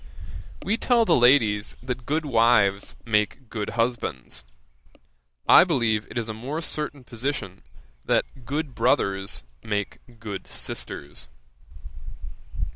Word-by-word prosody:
We 220 - +1
tell 235 -2 +3
the 170 - +4
ladies 120 -5 +4
that 125 -1 -5
good 155 +2 0
wives 115 -6 +3
make 105 +3 0
good 110 +1 -4
husbands; 65 - -1 1.0
I - - +9
believe 115 - +1
it - - -6
is 115 -1 -1
a 110 - -3
more 130 +8 -4
certain 150 -4 -3
position 120 -6 -4 0.4
that - - 0
good 145 +2 -3
brothers 100 - +1 0.2
make 105 -2 -3 0.2
good 105 -3 -6
sisters. 70 -3 -5
115 Hz, 115 wpm, -25 LUFS, 105-135 Hz, 1.0 s, I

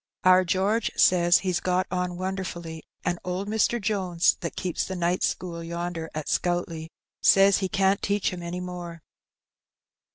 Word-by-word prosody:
Our 185 0 +6
George 195 +6 +1
says 175 -1 +5
he 185 -1 -2
got 180 +1 0
on 180 -1 -2
wonderfully; 180 -3 -5 0.2
and 175 -1 -1
old 180 +2 -3
Mr. 220 +2 +1
Jones, 190 -5 +1
that 170 - -4
keeps 180 -3 -2
the 190 - -5
night 175 +1 0
school 170 -2 -2
yonder 170 -1 -4
at 155 -1 -4
Scoutleigh, 175 -2 -1 0.3
says 195 0 +5
he 190 -2 -2
can't 195 +1 +2
teach 200 -1 0
him 180 - -6
any 175 +1 -5
more." 175 -2 -7
180 Hz, 155 wpm, -26 LUFS, 170-190 Hz, 0.3 s, Our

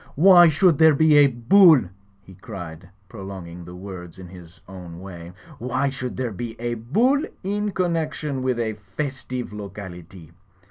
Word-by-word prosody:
"Why 175 +1 +7
should 160 0 +3
there 160 -2 +6
be 155 0 +4
a 145 -1 +7
Bull?" 145 +5 +5 0.4
he 95 - -15
cried, 90 -3 -10 0.2
prolong 95 -2 -9
ing 85 +1 -10
the 90 +1 -10
word 90 -2 -10
in 95 -1 -10
his 85 -2 -14
own 90 -3 -10
way. 85 -2 -10 0.3
"Why 130 +3 -1
should 125 -2 -6
there 125 -3 -2
be 115 +3 -7
a 120 0 -2
Bull 225 - +1 0.2
in 205 +2 -2
connection 160 -7 -2
with 130 -1 -1
a 110 -2 -3 0.2
festive 130 -5 -4
locality? 95 -5 -10
120 Hz, 155 wpm, -22 LUFS, 95-150 Hz, 0.4 s, Why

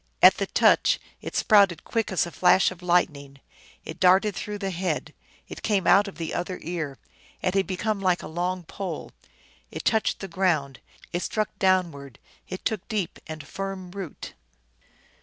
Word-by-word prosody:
At - - +9
the - - -1
touch - - +4 0.2
it - - -7
sprouted 200 -6 +4
quick 225 -3 -1
as 185 - +2
a 170 - -7
flash 185 +2 +4
of 180 -1 -11
lightning, 150 -6 0 0.5
it - - -8
darted 190 +2 +4
through 210 +2 -4
the 195 -1 -3
head, 180 +1 -2 0.3
it - - -9
came 200 -4 +1
out 200 +1 +5
of 200 - -9
the 165 -2 -4
other 180 +1 -3
ear, 160 -5 -4 0.5
it 185 - +1
had 195 0 +1
become 200 +2 -2
like 185 -2 +1
a - - -6
long 180 +2 -2
pole. 175 0 -6 0.6
It - - -7
touched 220 -1 +2
the 195 - -5
ground, 165 -8 0 0.3
it 175 - -1
struck 215 +2 -1
downward, 170 - +1 0.3
it 185 - -7
took 220 -5 -2
deep 205 -6 -3
and 155 -2 -7
firm 195 +1 -6
root. 190 -5 -7
185 Hz, 170 wpm, -26 LUFS, 170-195 Hz, 0.6 s, At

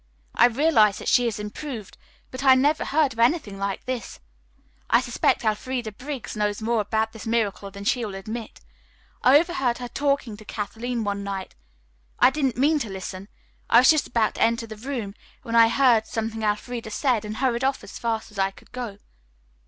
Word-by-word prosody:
I 240 - +6
realized 235 -5 +3
that - - -8
she 245 -1 +4
had 225 - -2
improved, 215 +1 -7 0.4
but 255 +1 -6
I 265 -1 +7
never 290 +4 +2
heard 290 -3 +2
of 225 - -12
anything 235 - +1
like 200 -1 -3
this. 255 -5 -5 0.7
I 235 - +5
suspect 245 -1 0
Elfreda 225 +2 -1
Briggs 260 +3 -7
knows 210 -1 -1
more 225 0 +1
about 220 +2 -1
this 225 0 -9
miracle 215 -3 -1
than 200 +1 -9
she 245 +3 +1
will 205 -3 -5
admit. 215 +4 -7 0.6
I 260 +3 +7
overheard 300 -7 0
her 245 - -6
talking 275 -5 -1
to 215 - -13
Kathleen 225 +3 -4
one 200 -1 -2
night. 195 -1 -5 0.6
I - - +6
didn't 270 -5 -1
mean 295 +4 +3
to 230 - -4
listen. 190 0 -7 0.4
I 230 - +6
was 260 - +7
just 310 -2 +1
about 225 -3 +1
to - - -7
enter 230 0 +2
the 220 -1 -9
room 225 -3 -5 0.3
when 230 -3 -3
I 230 -1 +8
heard 235 -3 +3
something 225 0 -3
Elfreda 220 +2 -2
said 235 0 0
and 210 +1 -6
hurried 255 -2 0
off 270 0 0
as - - -9
fast 225 -2 -2
as 205 - -9
I 195 0 +2
could 195 - -19
go." 240 -5 -6
230 Hz, 190 wpm, -24 LUFS, 210-255 Hz, 0.7 s, I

